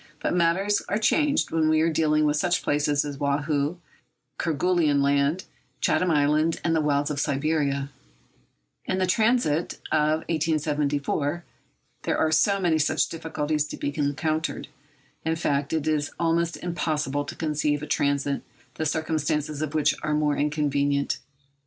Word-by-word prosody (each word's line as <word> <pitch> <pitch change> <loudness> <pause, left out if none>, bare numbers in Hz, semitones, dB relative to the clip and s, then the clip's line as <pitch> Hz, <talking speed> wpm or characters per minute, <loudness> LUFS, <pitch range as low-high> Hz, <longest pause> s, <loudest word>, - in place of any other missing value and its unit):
But - - -1
matters 180 +4 +2
are 205 - +1
changed 290 +6 +2
when 160 -1 +2
we 155 0 +3
are 165 - +3
dealing 155 -1 +2
with 150 0 +2
such 175 +3 +1
places 145 0 +1
as 140 -1 -6
Woahoo, 145 +2 0 0.6
Kerguelen 165 -2 +2
Land, 140 +5 +2 0.4
Chatham 180 - +2
Island, 155 +1 +2
and 165 -1 +1
the 160 - +2
wilds 145 0 +1
of 145 - -3
Siberia. 140 -1 0 0.9
In 185 - -1
the 190 - +2
transit 215 -5 +1 0.2
of 155 +1 +2
1874 150 0 -1 0.6
there - - -1
are 160 - +2 0.3
many 170 -4 +2
such 150 - +1
difficulties 155 -2 -2
to - - -7
be 145 - -3
encountered. 155 +2 -1 0.5
In 160 0 0
fact, 145 -3 -1
it 160 -2 -1
is 150 -2 0
almost 170 0 +1
impossible 150 -5 -2
to 145 - -8
conceive 150 -2 -1
a - - -2
transit 140 -1 0 0.3
the 160 - -2
circumstances 155 -1 -1
of 155 0 -3
which 155 - +3
are 155 - 0
more 150 -1 +1
inconvenient. 145 -1 0
155 Hz, 145 wpm, -25 LUFS, 145-165 Hz, 0.9 s, we